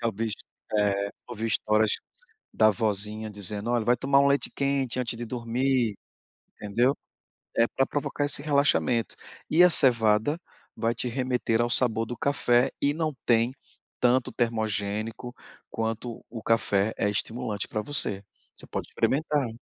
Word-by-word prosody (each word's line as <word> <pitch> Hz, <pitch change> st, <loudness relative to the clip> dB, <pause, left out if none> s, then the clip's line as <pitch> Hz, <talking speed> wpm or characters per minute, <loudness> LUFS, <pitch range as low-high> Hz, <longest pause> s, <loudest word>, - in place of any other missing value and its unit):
já 115 Hz, -, -1 dB
ouvi, 110 Hz, +1 st, -2 dB, 0.5 s
eh, 100 Hz, -1 st, +1 dB, 0.2 s
ouvi 115 Hz, -1 st, -4 dB
histórias 110 Hz, 0 st, +2 dB, 0.6 s
da 110 Hz, 0 st, +5 dB
vozinha 105 Hz, +1 st, -1 dB
dizendo: 105 Hz, +2 st, -3 dB
"Olha, 120 Hz, -2 st, +1 dB
vai 120 Hz, +1 st, +3 dB
tomar 140 Hz, +3 st, +3 dB
um 140 Hz, -, +4 dB
leite 140 Hz, 0 st, +2 dB
quente 140 Hz, -3 st, 0 dB
antes 120 Hz, -2 st, -2 dB
de 120 Hz, -, -4 dB
dormir", 120 Hz, -1 st, 0 dB, 0.6 s
entendeu, 120 Hz, +7 st, +1 dB, 0.6 s
é 115 Hz, -, +5 dB
pra 135 Hz, -, +1 dB
provocar 145 Hz, 0 st, -2 dB
esse 140 Hz, 0 st, -1 dB
relaxamento. 140 Hz, -5 st, +2 dB, 0.3 s
E 170 Hz, +3 st, +6 dB
a 180 Hz, -, +6 dB
cevada 115 Hz, +1 st, +4 dB, 0.4 s
vai 115 Hz, +1 st, 0 dB
te 125 Hz, -, -2 dB
remeter 125 Hz, -2 st, 0 dB
ao 120 Hz, -, -1 dB
sabor 115 Hz, -3 st, +1 dB
do 120 Hz, -, -6 dB
café 125 Hz, -3 st, +2 dB
e 145 Hz, +1 st, +2 dB
não 155 Hz, -2 st, -1 dB
tem 115 Hz, +1 st, +3 dB, 0.5 s
tanto 125 Hz, +1 st, +3 dB
termogênico 110 Hz, 0 st, -2 dB, 0.4 s
quanto 115 Hz, +1 st, -4 dB
o 115 Hz, -2 st, -7 dB
café 110 Hz, -2 st, +2 dB
é 105 Hz, -, +1 dB
estimulante 110 Hz, 0 st, -2 dB
pra 110 Hz, -, -2 dB
você. 100 Hz, -8 st, -2 dB, 0.3 s
Você -, -, -9 dB
pode -, -, -4 dB
experimentar. 145 Hz, -2 st, 0 dB
115 Hz, 145 wpm, -27 LUFS, 110-130 Hz, 0.6 s, E